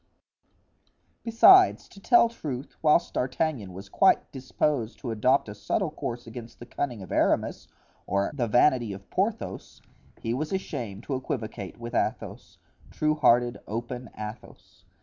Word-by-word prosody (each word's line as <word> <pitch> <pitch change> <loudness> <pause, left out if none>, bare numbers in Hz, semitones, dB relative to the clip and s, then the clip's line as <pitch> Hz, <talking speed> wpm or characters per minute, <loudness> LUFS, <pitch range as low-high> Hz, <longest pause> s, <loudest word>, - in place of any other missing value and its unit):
Besides, 370 +12 +6
to 200 - -15
tell 240 +3 +5
truth, 145 - -7
whilst 160 +2 +3
D'Artagnan 125 - -2
was 95 +2 -10
quite - - +3
disposed 130 -2 -2
to 120 - -5
adopt 125 +5 +2
a 105 - -6
subtle 155 - -2
course 120 -5 -5
against 115 0 -10
the 120 - -10
cunning 120 -4 -4
of - - -11
Aramis - - 0 0.4
or 100 0 0
the 125 -5 -1
vanity 120 -1 +3
of 100 +1 -12
Porthos, 210 +4 -3 0.4
he 115 - -2
was 150 +5 -3
ashamed 115 - -4
to 140 - -4
equivocate 110 -6 -5
with 120 0 -7
Athos, - - -3 0.3
true 155 0 0
hearted, 120 -5 +3
open 120 +2 -5
Athos. 105 +2 -10
125 Hz, 140 wpm, -27 LUFS, 115-150 Hz, 0.4 s, Besides